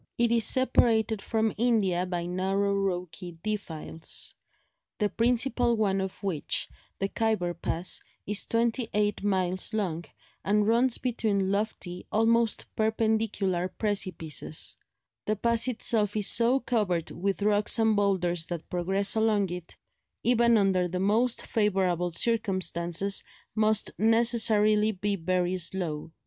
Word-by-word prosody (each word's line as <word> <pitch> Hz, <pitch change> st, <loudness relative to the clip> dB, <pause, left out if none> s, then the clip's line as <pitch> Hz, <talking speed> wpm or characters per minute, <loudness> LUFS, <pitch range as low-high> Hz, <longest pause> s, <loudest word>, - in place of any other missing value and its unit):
It 235 Hz, -1 st, +2 dB
is 230 Hz, -2 st, +3 dB
separated 225 Hz, -4 st, +3 dB
from 220 Hz, 0 st, 0 dB
India 200 Hz, -7 st, +1 dB
by 175 Hz, -1 st, -3 dB
narrow 195 Hz, +3 st, 0 dB
rocky 180 Hz, -3 st, -3 dB
defiles, 165 Hz, -6 st, -3 dB, 0.6 s
the 210 Hz, -1 st, 0 dB
principal 240 Hz, 0 st, +1 dB
one 195 Hz, -3 st, +1 dB
of 190 Hz, +1 st, -6 dB
which, 180 Hz, -7 st, -1 dB, 0.3 s
the 195 Hz, -, -1 dB
Khyber 210 Hz, -5 st, -1 dB
pass, 170 Hz, +1 st, -3 dB, 0.2 s
is 205 Hz, 0 st, -1 dB
twenty 230 Hz, +1 st, 0 dB
eight 210 Hz, -1 st, 0 dB
miles 185 Hz, +1 st, 0 dB
long, 175 Hz, -6 st, -2 dB, 0.4 s
and 210 Hz, +1 st, +2 dB
runs 235 Hz, +2 st, +2 dB
between 210 Hz, -6 st, -1 dB
lofty, 200 Hz, -3 st, -3 dB
almost 225 Hz, +1 st, +2 dB
perpendicular 220 Hz, -4 st, 0 dB
precipices; 185 Hz, -8 st, -2 dB, 0.5 s
the 215 Hz, -, 0 dB
pass 235 Hz, +3 st, +2 dB
itself 220 Hz, -4 st, +1 dB
is 210 Hz, -, 0 dB
so 240 Hz, +3 st, +4 dB
covered 205 Hz, -10 st, -1 dB
with 195 Hz, +3 st, -2 dB
rocks 210 Hz, +2 st, +3 dB
and 220 Hz, -1 st, +3 dB
boulders 180 Hz, -5 st, +1 dB
that 170 Hz, -3 st, -7 dB
progress 190 Hz, +3 st, 0 dB
along 215 Hz, -4 st, +1 dB
it, 175 Hz, -1 st, -8 dB, 0.5 s
even 235 Hz, -1 st, +4 dB
under 190 Hz, -3 st, +2 dB
the 180 Hz, +1 st, -4 dB
most 220 Hz, +6 st, +1 dB
favourable 185 Hz, -5 st, 0 dB
circumstances, 190 Hz, -3 st, 0 dB, 0.3 s
must 215 Hz, -1 st, +1 dB
necessarily 220 Hz, -2 st, +3 dB
be 205 Hz, 0 st, -2 dB
very 180 Hz, +1 st, -1 dB
slow. 165 Hz, -3 st, -3 dB
205 Hz, 125 wpm, -27 LUFS, 180-225 Hz, 0.6 s, so